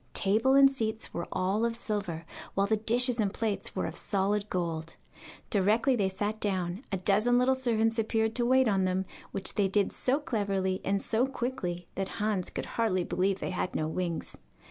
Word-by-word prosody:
Table 220 +7 +3
and 275 0 +8
seats 220 -4 -3
were 170 - -4
all 190 +4 0
of 235 0 0
silver, 195 -8 -4 0.3
while 195 - +3
the 220 +2 +2
dishes 240 +3 +2
and 205 -3 +1
plates 215 -1 -3
were - - -1
of - - -5
solid 205 0 -1
gold. 165 -2 -3 0.6
Directly 220 +6 +3
they 200 -5 +1
sat 205 +3 -3
down, 185 +1 -1
a 195 - 0
dozen 210 +6 +2
little 250 +1 +4
servants 230 -3 +1
appeared 220 0 +1
to 240 - +1
wait 260 0 +4
on 195 -3 +2
them, 185 +1 0 0.3
which 190 -1 +2
they 205 -2 +2
did 200 +1 +1
so 265 +3 0
cleverly 195 -8 -1
and 200 +1 +1
so 235 +4 +1
quickly 200 -10 -4
that 195 0 -4
Hans 205 -4 -1
could - - -4
hardly 205 -6 0
believe 190 +2 0
they - - -4
had 180 - -3
no 155 - 0
wings. 170 0 -3
205 Hz, 190 wpm, -29 LUFS, 190-230 Hz, 0.6 s, and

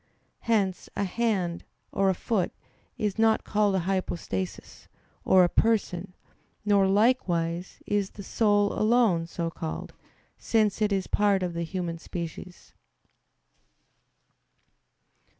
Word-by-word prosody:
Hence 200 -5 0
a 200 - 0
hand, 190 -4 -1 0.3
or 195 0 +2
a 190 - +1
foot, 195 -2 -1 0.5
is 210 0 -2
not 225 0 +3
called 205 -2 +1
a - - +2
hypostasis, 170 - -3 0.4
or 185 -1 +6
a - - +5
person; 195 -3 0 0.5
nor, 200 -2 +4
likewise, 185 -5 +1
is 205 -2 0
the 200 - -10
soul 205 -1 +2
alone 215 -7 +2
so 170 -1 -3
called, 160 -1 -6 0.5
since 215 -2 +1
it 210 -1 +2
is 195 -2 0
a - - -15
part 200 -2 +2
of 175 -1 -2
the 170 - -3
human 170 -1 -3
species. 175 +1 -8
195 Hz, 120 wpm, -27 LUFS, 175-210 Hz, 0.5 s, or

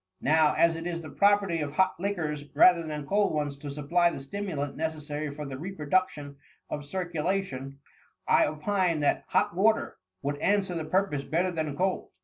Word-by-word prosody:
Now, 155 +1 +4
as 170 -1 +4
it 165 +1 -5
is 170 -1 -3
the 155 - -9
property 200 -4 +3
of 145 0 -4
hot 185 +2 +3
liquors, 160 -7 -2
rather 170 +3 +6
than 150 -2 -5
cold 200 0 +1
ones, 145 -2 -1
to 145 - -7
supply 155 +5 +2
the 170 - -6
stimulant 145 -2 -4
necessary 155 -1 -3
for 150 +1 -6
the 135 -1 -6
reproduction 155 -4 -1 0.3
of 145 - -3
circulation, 165 -5 -3 0.5
I - - +5
opine 170 +1 0
that 145 - +1
hot - - +1
water 215 +4 +2 0.3
would 145 +1 -1
an 200 +6 +2
swer 185 -3 -4
the 160 - -3
purpose 185 -5 0
better 175 +5 0
than 155 -4 -3
cold." 185 +1 -1
160 Hz, 175 wpm, -28 LUFS, 145-185 Hz, 0.5 s, rather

